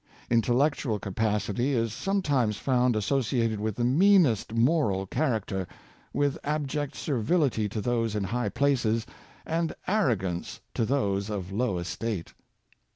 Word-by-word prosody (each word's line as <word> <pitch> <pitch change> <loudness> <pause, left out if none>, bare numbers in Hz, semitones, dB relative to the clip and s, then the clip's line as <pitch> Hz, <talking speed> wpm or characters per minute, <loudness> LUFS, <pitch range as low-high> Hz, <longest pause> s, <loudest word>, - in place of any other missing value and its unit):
Intellectual 120 +1 +2
capacity 105 +5 -1
is 115 -3 0
sometimes 140 - 0
found 125 -1 +2
associated 115 -1 0
with 110 -1 -2
the 120 - -1
meanest 150 - +4
moral 115 - +2
character 110 - -1 0.2
— - - -30
with 145 -1 +1
abject 145 -1 -2
servility 130 -4 0
to 110 - -4
those 115 -2 0
in 105 - 0
high 120 +6 -1
places, 120 -4 +1 0.4
and 165 0 -1
arro 185 - +2
gance 90 -2 -4
to 115 - 0
those 100 -6 0
of 100 -3 -4
low 105 -2 0
estate. 90 +2 -4
115 Hz, 130 wpm, -27 LUFS, 105-140 Hz, 0.4 s, meanest